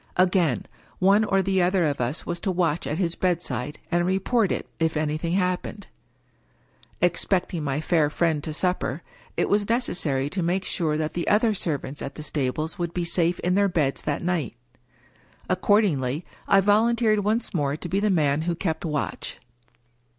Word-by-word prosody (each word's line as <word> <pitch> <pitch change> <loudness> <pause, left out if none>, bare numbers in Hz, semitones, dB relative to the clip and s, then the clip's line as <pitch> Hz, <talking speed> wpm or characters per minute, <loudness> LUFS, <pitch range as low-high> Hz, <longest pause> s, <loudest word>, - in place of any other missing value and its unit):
Again, 180 - +2 0.3
one 200 +3 +4
or 195 -2 +2
the 190 0 +2
other 180 0 +2
of 145 -4 -1
us 125 +6 -2
was 175 - -3
to 195 - -1
watch 170 -3 0
at 150 - -2
his 170 -3 0
bedside, 155 -7 -2
and 175 0 +2
report 195 +4 +1
it, - - -2
if 160 -1 +1
anything 155 +2 -1
hap 180 -1 +1
pened. 205 - -8 1.2
Expecting 175 -1 +1
my 140 0 -1
fair 155 -2 +2
friend 155 -1 0
to 155 - -4
supper, 175 -2 -1 0.3
it - - +2
was 205 0 +2
neces 235 -4 +1
sary 135 -5 0
to 185 +5 -2
make 180 +3 0
sure 155 -3 0
that 155 0 -2
the 175 - -3
other 220 +1 +3
servants 150 -6 -3
at 135 - -5
the 155 - -7
stables 155 +4 -2
would 170 -1 -3
be 175 -1 -1
safe 170 0 +1
in 180 - +1
their 200 +1 +3
beds 150 -6 0
that 145 +1 -2
night. 175 -8 -1 0.9
Accordingly, 180 - +1 0.2
I 195 - +5
volunteered 215 +2 +3
once 220 +4 0
more 145 -4 0
to 175 - -5
be 190 +3 0
the 210 +1 +1
man 150 -5 +2
who 170 - 0
kept 160 -2 -2
watch. 150 -4 -3
175 Hz, 180 wpm, -25 LUFS, 150-190 Hz, 1.2 s, I